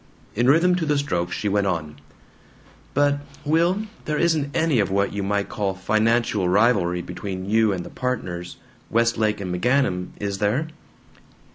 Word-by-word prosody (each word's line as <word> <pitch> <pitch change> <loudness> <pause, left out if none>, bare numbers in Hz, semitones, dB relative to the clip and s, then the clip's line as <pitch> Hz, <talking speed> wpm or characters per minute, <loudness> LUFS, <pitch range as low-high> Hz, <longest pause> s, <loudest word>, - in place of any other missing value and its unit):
In 120 +3 +1
rhythm 165 +6 +5
to 165 - -1
the 150 -1 +2
strokes 85 -11 -1
she 105 - -2
went 100 0 +1
on: 75 -5 -3 1.0
"But, 145 0 +3 0.3
Will, 170 +7 +2 0.2
there 150 -1 -1
isn't 160 -4 +1
any 160 -6 +2
of 100 - +1
what 100 +1 0
you 100 - -2
might 100 +1 -1
call 100 -3 -2
financial 110 -1 +1
rivalry 95 -4 +2
between 95 -2 -6
you 110 0 +3
and 90 -3 -3
the - - -10
partners 90 -9 -4 0.3
Westlake 115 -2 +1
and 90 -3 -4
McGanum 95 -3 +1
is 100 -1 -3
there?" 120 +11 0
105 Hz, 155 wpm, -23 LUFS, 95-140 Hz, 1.0 s, rhythm